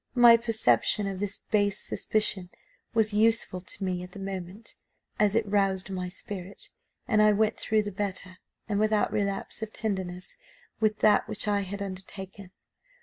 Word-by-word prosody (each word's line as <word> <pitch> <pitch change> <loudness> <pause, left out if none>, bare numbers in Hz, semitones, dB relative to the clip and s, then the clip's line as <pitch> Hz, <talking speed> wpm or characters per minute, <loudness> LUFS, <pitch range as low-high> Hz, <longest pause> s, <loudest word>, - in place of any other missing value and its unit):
My 240 -1 +9
perception 220 - +2
of 195 -1 -3
this 200 0 -3
base 205 -1 +2
suspicion 205 -4 0 0.4
was 220 -2 +2
useful 215 -3 +2
to 190 - -4
me 180 -1 -1
at 180 0 -10
the - - -9
moment, 195 +2 -6 0.5
as 210 0 +3
it 225 -1 +2
roused 195 -2 +1
my 180 -1 -3
spirit, 190 +1 -5 0.4
and 215 -1 +3
I 215 0 +6
went 215 +1 +1
through 215 -1 +1
the 205 - -4
better, 185 -2 -4 0.3
and 205 -2 0
without 215 0 +2
relapse 200 +1 -1
of 220 -1 -4
tenderness, 190 -5 -4 0.4
with 215 -1 +1
that 210 -1 +4
which 210 - -2
I 205 -1 +2
had 200 +1 -4
undertaken. 190 0 -7
200 Hz, 160 wpm, -28 LUFS, 190-215 Hz, 0.5 s, My